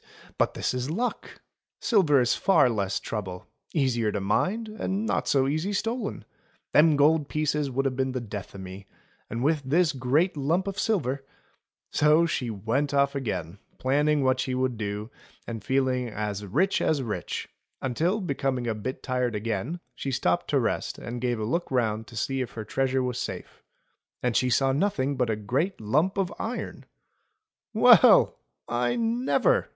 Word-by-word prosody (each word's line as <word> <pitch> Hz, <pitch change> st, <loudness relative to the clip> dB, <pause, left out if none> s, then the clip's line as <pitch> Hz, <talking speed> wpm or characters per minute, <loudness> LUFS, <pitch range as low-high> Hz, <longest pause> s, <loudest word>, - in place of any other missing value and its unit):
But -, -, +2 dB
this -, -, -1 dB
is 125 Hz, +2 st, -2 dB
luck! 235 Hz, +10 st, -3 dB, 0.4 s
Silver 170 Hz, -, +4 dB
is 120 Hz, -, +2 dB
far 160 Hz, -10 st, +4 dB
less 100 Hz, -3 st, -1 dB
trouble 95 Hz, -5 st, -5 dB, 0.2 s
— -, -, -56 dB
easier 120 Hz, -7 st, +1 dB
to 105 Hz, -, -2 dB
mind, 185 Hz, -, 0 dB
and 215 Hz, -1 st, -3 dB
not -, -, -1 dB
so 135 Hz, -1 st, +3 dB
easy 155 Hz, +8 st, -1 dB
stolen. 225 Hz, +2 st, -2 dB, 0.5 s
Them 155 Hz, 0 st, +6 dB
gold 145 Hz, +1 st, +3 dB
pieces 150 Hz, -1 st, 0 dB
would 135 Hz, +2 st, -1 dB
have 130 Hz, -1 st, 0 dB
been 130 Hz, 0 st, 0 dB
the 130 Hz, -, -1 dB
death 105 Hz, -4 st, -7 dB
o' -, -, -7 dB
me, 95 Hz, +1 st, -9 dB, 0.4 s
and 115 Hz, +2 st, -3 dB
with 150 Hz, +1 st, +2 dB
this 160 Hz, +5 st, +2 dB
great 140 Hz, +8 st, +1 dB
lump 160 Hz, +7 st, 0 dB
of 200 Hz, 0 st, -4 dB
silver 140 Hz, -, 0 dB, 0.2 s
— -, -, -40 dB
" -, -, -60 dB
So 155 Hz, +3 st, +5 dB
she 130 Hz, -7 st, -2 dB
went 115 Hz, +8 st, -1 dB
off 140 Hz, 0 st, +3 dB
again 105 Hz, -, -4 dB, 0.2 s
planning 145 Hz, +2 st, +2 dB
what 130 Hz, 0 st, +2 dB
she 130 Hz, -1 st, -1 dB
would 130 Hz, -1 st, 0 dB
do, 105 Hz, +1 st, -4 dB, 0.3 s
and 115 Hz, -2 st, -6 dB
feeling 130 Hz, -2 st, +1 dB
as 105 Hz, -1 st, -4 dB
rich 185 Hz, -, +1 dB
as 145 Hz, -4 st, +1 dB
rich, 110 Hz, -3 st, -4 dB, 0.3 s
until 165 Hz, -, 0 dB
becoming 135 Hz, -7 st, -1 dB
a 115 Hz, -, 0 dB
bit 110 Hz, +5 st, -5 dB
tired 125 Hz, -3 st, -1 dB
again 115 Hz, -, -3 dB
she 140 Hz, -, -5 dB
stopped 90 Hz, -9 st, 0 dB
to -, -, +3 dB
rest -, -, -1 dB
and 120 Hz, 0 st, -6 dB
gave 120 Hz, -2 st, 0 dB
a -, -, -2 dB
look 170 Hz, +11 st, -1 dB
round 110 Hz, -4 st, 0 dB
to 120 Hz, -, -12 dB
see 135 Hz, +3 st, -1 dB
if 125 Hz, -, -5 dB
her 110 Hz, -2 st, -6 dB
treasure 130 Hz, +3 st, 0 dB
was 125 Hz, -1 st, -2 dB
safe; -, -, -6 dB, 0.6 s
and 125 Hz, -2 st, 0 dB
she 125 Hz, -, +3 dB
saw 135 Hz, +2 st, +3 dB
nothing 140 Hz, -3 st, 0 dB
but 125 Hz, -3 st, 0 dB
a 110 Hz, -, +1 dB
great 130 Hz, -, -1 dB
lump 150 Hz, -, +1 dB
of 195 Hz, -3 st, 0 dB
iron! -, -, -5 dB, 0.8 s
Well! -, -, +6 dB, 0.3 s
I 120 Hz, 0 st, 0 dB
never!" 245 Hz, -, +1 dB
130 Hz, 175 wpm, -26 LUFS, 115-155 Hz, 0.8 s, Them